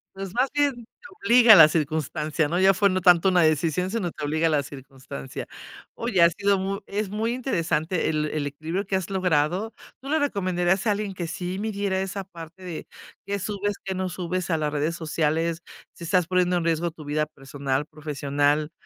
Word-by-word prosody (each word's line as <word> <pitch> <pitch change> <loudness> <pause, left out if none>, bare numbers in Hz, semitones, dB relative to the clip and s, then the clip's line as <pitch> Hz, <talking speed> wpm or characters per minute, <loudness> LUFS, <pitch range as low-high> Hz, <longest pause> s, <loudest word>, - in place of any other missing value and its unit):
Pues 195 -1 -6
más 255 +2 +1
bien 290 -2 +2
te 240 +9 -15 0.2
obliga 240 - +8
a - - +10
la 160 -5 +10
circunstancia, 155 0 -1
no 175 +4 -1
ya 190 +1 +6
fue 200 +2 +3
no 185 0 0
tanto 180 +1 +5
una 180 -1 +4
decisión, 160 +4 +1
sino 200 -6 -1
te 150 - -8
obliga 160 +2 +1
la 150 -2 +1
circunstancia. 135 - -9 0.5
Oye, 225 -7 0
ha 170 - +7
sido 200 +3 +1
muy 195 +1 -2
es 205 -1 -3
muy 220 +3 -1
interesante 170 - -1
el 155 -1 0
el 150 -1 -2
equilibrio 160 +7 -4
que 190 - -1
has 190 -1 -2
logrado. 180 +3 +1 0.3
Tú 275 - -8
le 315 - +2
recomendarías 190 - 0
a - - +4
alguien 205 -1 -2
que 175 -2 -4
sí 180 +3 -4
midiera 200 -3 -1
esa 195 +1 -4
parte 170 0 -12
de, 175 -3 -7 0.4
que 200 0 -2
subes, 205 +1 -2
que 190 - -3
no 185 0 -2
subes, 180 +1 -3
a 160 - +2
las 150 -1 -2
redes 155 +3 -1
sociales. 165 +1 -1 0.3
Si - - -12
estás 180 +1 +2
poniendo 180 -1 +2
en 170 - -1
riesgo 165 +1 0
tu 155 -2 -12
vida 150 +1 0
personal, 135 0 -3
profesional, 145 0 -1
175 Hz, 195 wpm, -25 LUFS, 155-195 Hz, 0.5 s, a